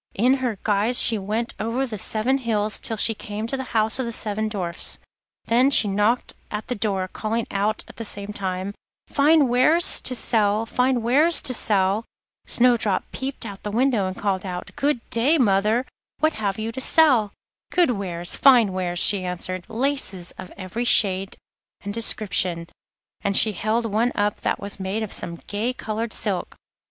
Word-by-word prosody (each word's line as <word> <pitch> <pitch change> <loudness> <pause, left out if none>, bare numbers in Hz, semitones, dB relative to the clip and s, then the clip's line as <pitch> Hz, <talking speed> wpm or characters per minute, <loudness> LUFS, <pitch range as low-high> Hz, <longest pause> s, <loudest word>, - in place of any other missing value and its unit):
In 245 +6 +3
this 240 -5 -2
guise 215 +4 +2
she 225 -2 +4
went 215 +4 -3
over 235 +5 -1
the 220 -5 -6
seven 245 +8 +1
hills 215 -4 -1
till 225 - -4
she 225 - +2
came 215 0 -6
to 235 - -2
the 265 -1 -5
house 220 +3 +2
of 260 - -1
the - - -3
seven 215 -1 -1
Dwarfs. 180 -5 -3 0.5
There 245 +4 +3
she 250 -6 +4
knocked 210 +5 0 0.2
at 210 0 -5
the - - 0
door, 200 -4 -2
calling 225 +4 -3
out 205 +2 -1
at - - -14
the 230 - -5
same 205 -1 -3
time: 190 0 -3 0.3
'Fine 295 0 +3
wares 280 +8 +3
to 255 - 0
sell, 215 -2 +2
fine 250 +1 0
wares 300 +8 +4
to 260 - +3
sell!' 205 -1 +1 0.4
Snowdrop 235 -6 +2
peeped 265 -2 -5
out 200 -3 -7
of - - -34
the 210 - -5
window, 230 -3 +1
and 185 - -6
called 195 -2 -1
out: 180 -2 -6
'Good 280 -4 -1
day, 265 +8 +3
mother, 215 0 +2 0.3
what 310 0 +1
have 200 -3 -3
you 220 +1 -3
to 260 +3 -6
sell?' 255 -9 +4 0.4
'Good 350 -7 +3
wares, 175 -5 -1
fine 240 -8 +5
wares,' 180 -1 -3
she 190 +2 +4
answered; 180 0 -3
'laces 230 -8 -1
of 185 - -11
every 190 +5 -4
shade 195 -5 +2 0.4
and 205 0 -5
description,' 185 -6 +1 0.6
and 200 0 +3
she 220 - +4
held 220 +3 -1
one 225 +3 0
up 205 0 -1
that - - -1
was 200 0 -4
made 195 +4 -3
of 215 - -6
some 170 - -1
gay 220 +5 -2
coloured 225 -1 -4
silk. 200 -5 -3
215 Hz, 180 wpm, -23 LUFS, 200-245 Hz, 0.6 s, fine